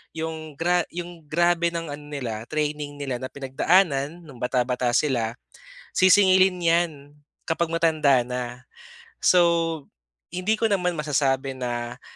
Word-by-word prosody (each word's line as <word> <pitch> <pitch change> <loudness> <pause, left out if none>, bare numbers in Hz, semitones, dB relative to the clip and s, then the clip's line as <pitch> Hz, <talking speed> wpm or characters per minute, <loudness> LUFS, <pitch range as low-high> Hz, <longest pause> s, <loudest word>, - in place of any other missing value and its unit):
'yung 160 -2 -5
gra 175 +2 +1
yung 170 -3 -8
grabe 170 +2 +2
ng 165 -3 -4
ano 145 +1 -7
nila, 120 -6 -5
training 150 -1 -3
nila 135 -4 -4
na 130 - -4
pinagdaanan 145 +3 +1
nung 135 -6 -13
bata-bata 125 -1 0
sila, 120 -6 +1 0.6
sisingilin 185 -1 +5
'yan 170 0 +2 0.5
kapag 165 0 -1
matanda 155 -6 +3
na. 125 0 -5 0.6
So, 170 -4 +3 0.5
hindi 210 +4 0
ko 225 - +2
naman 180 -5 0
masasabi 135 -2 0
na 120 0 -5
150 Hz, 125 wpm, -24 LUFS, 130-170 Hz, 0.6 s, sisingilin